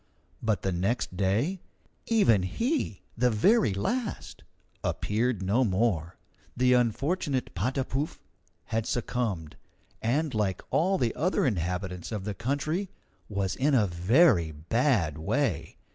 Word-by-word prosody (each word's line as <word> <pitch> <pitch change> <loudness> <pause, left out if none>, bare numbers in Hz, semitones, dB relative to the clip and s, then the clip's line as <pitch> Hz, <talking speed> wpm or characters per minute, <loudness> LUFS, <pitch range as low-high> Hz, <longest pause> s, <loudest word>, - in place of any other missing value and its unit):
But 110 -5 0
the 95 - 0
next 95 +3 -1
day, 110 - 0 0.5
even 200 - +4
he, 230 - -2
the 125 +2 +3
very 120 - +3
last, 230 - -3 0.4
appeared 110 -1 0
no 105 +8 +2
more. 95 -6 0 0.4
The 125 0 +4
unfortunate 130 - 0
Patapouf 130 - -2 0.4
had 115 0 -2
succumbed, 110 -10 -2 0.4
and, 145 +6 0
like 105 -4 -1
all 190 +4 +2
the 120 -7 0
other 180 +5 +1
inhabitants 90 -3 -2
of 105 -4 -3
the 105 +1 -3
country, 145 - -2 0.4
was 100 -3 -1
in 140 +2 +2
a 110 -5 +4
very 90 - +4
bad 85 - 0
way. 85 - -1
115 Hz, 120 wpm, -28 LUFS, 95-140 Hz, 0.5 s, even